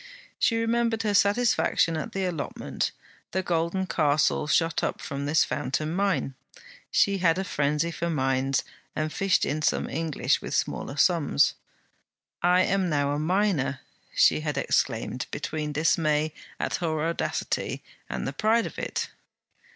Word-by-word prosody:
She 230 - +3
remembered 230 0 +1
her 210 -1 +1
satisfaction 200 -5 +3
at 155 - -4
the 195 -1 -2
allotment; 165 -6 -3 0.4
the 190 +1 0
golden 170 +2 0
castle 150 -3 +2
shot 165 +1 +2
up - - -1
from 140 0 -4
this 155 +2 +4
fountain 155 +4 -2
mine. 185 -8 0 0.6
She 200 -1 +3
had 170 -1 +3
a 190 - 0
frenzy 150 0 0
for 170 +1 -3
mines 135 -3 +1 0.3
and 155 0 -2
fished 195 -3 +2
in 155 +2 -2
some - - +1
English 160 -3 0
with - - -4
smaller 135 - -2
sums. 150 - +3 0.9
'I 180 +1 +4
am 190 -2 +1
now 145 -2 +1
a 145 - -1
miner,' 170 -5 +1 0.3
she - - +5
had 155 -1 -3
exclaimed, - - 0
between 155 -1 -3
dismay 155 0 +1 0.3
at - - -1
her 160 -3 -1
audacity 170 - -2 0.3
and - - -3
the 135 - -3
pride 220 +9 +2
of - - -6
it. - - -3
165 Hz, 145 wpm, -26 LUFS, 150-190 Hz, 0.9 s, she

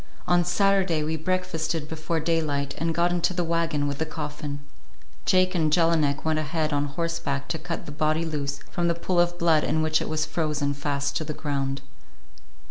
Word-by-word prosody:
On 175 0 +4
Saturday 185 -2 +2
we 160 +1 -1
breakfasted 165 -2 -1
before 160 +1 -2
daylight 150 -4 0
and 165 0 0
got 175 +1 +3
into 175 +1 +1
the 175 - +1
wagon 165 -3 0
with 140 -1 -3
the 160 - +1
coffin. 150 -2 -5 0.7
Jake 185 0 +4
and 160 -4 +2
Jelinek 160 -4 +3
went 160 -1 +2
ahead 155 0 -1
on 145 0 +1
horseback 145 -2 -2
to 160 - -1
cut 170 - -5
the - - -7
body 155 +2 +1
loose 145 -3 -3
from 175 0 0
the 170 - +2
pool 175 +1 0
of 175 0 +2
blood 165 -3 +4
in 155 - +1
which 155 0 +2
it - - -3
was 155 -1 0
frozen 150 -3 -1
fast 140 0 -2
to - - -2
the 155 -1 -5
ground. 140 -2 -2
160 Hz, 190 wpm, -26 LUFS, 150-170 Hz, 0.7 s, On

